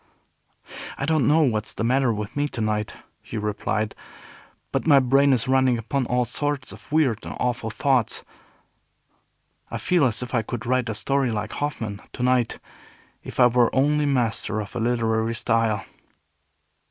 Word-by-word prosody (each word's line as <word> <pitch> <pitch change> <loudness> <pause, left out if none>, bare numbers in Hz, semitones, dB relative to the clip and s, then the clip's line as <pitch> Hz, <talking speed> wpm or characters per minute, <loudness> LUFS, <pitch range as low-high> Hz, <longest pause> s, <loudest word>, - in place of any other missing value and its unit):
"I 140 - -2
don't 155 -5 +2
know 155 +2 +5
what's 110 -6 0
the - - -2
matter 130 +1 +2
with 105 -1 -4
me 145 0 +1
to 130 - -7
night," 105 -1 -1 0.3
he 115 - -7
replied, 105 0 -2 0.8
"but - - -1
my 145 -3 +7
brain 135 +2 +4
is 125 -3 +1
running 130 -2 +3
upon 125 +3 -2
all 125 0 +1
sorts 145 +2 -2
of - - -14
weird 145 -8 +2
and - - -7
awful 120 -2 -1
thoughts. 130 -1 +1 1.5
I - - -4
feel 180 -4 +2
as 115 -1 0
if 125 - -8
I 120 - +2
could 110 +1 -6
write 125 -1 +1
a 110 - -2
story 135 +5 +1
like 105 -1 -3
Hoffman, 110 -8 -4
to 125 - -4
night, 125 -2 +2 0.6
if - - -9
I 125 - +8
were 120 -1 +4
only 145 +2 +2
master 120 -5 0
of 105 -2 -7
a - - -2
literary 115 -1 0
style." 115 -3 +1
120 Hz, 165 wpm, -24 LUFS, 110-135 Hz, 1.5 s, I